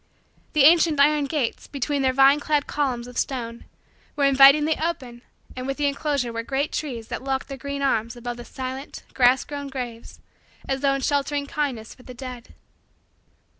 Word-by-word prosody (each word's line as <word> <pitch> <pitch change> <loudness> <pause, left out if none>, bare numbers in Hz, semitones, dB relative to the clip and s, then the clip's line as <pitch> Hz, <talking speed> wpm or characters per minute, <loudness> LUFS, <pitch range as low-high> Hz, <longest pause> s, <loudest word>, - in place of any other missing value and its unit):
The 300 -3 +4
ancient 320 -1 +5
iron 295 0 +4
gates, 275 -4 -2
between 285 +1 -2
their 260 -1 +3
vine 275 +2 +5
clad 295 -1 0
columns 255 -5 -2
of 250 0 -5
stone, 235 -3 -4 0.5
were 290 - 0
invitingly 275 +3 +6
open 270 -8 -4 0.3
and 255 0 -5
within 275 +2 -3
the 285 - +4
enclosure 280 -4 -2
were 230 - -2
great 270 +5 -2
trees 240 -7 -4
that - - -5
locked 265 0 -2
their 275 - -6
green 280 0 -4
arms 230 -3 0
above 240 0 -6
the 240 - -9
silent, 260 +1 -7
grass 250 0 +4
grown, 285 -1 -6
graves 245 -4 -7 0.5
as 270 0 -2
though 275 -1 +2
in 275 - -3
sheltering 285 +1 0
kindness 275 -7 -3
for - - -19
the 250 0 -11
dead. 250 -2 -9
270 Hz, 175 wpm, -24 LUFS, 250-285 Hz, 0.5 s, invitingly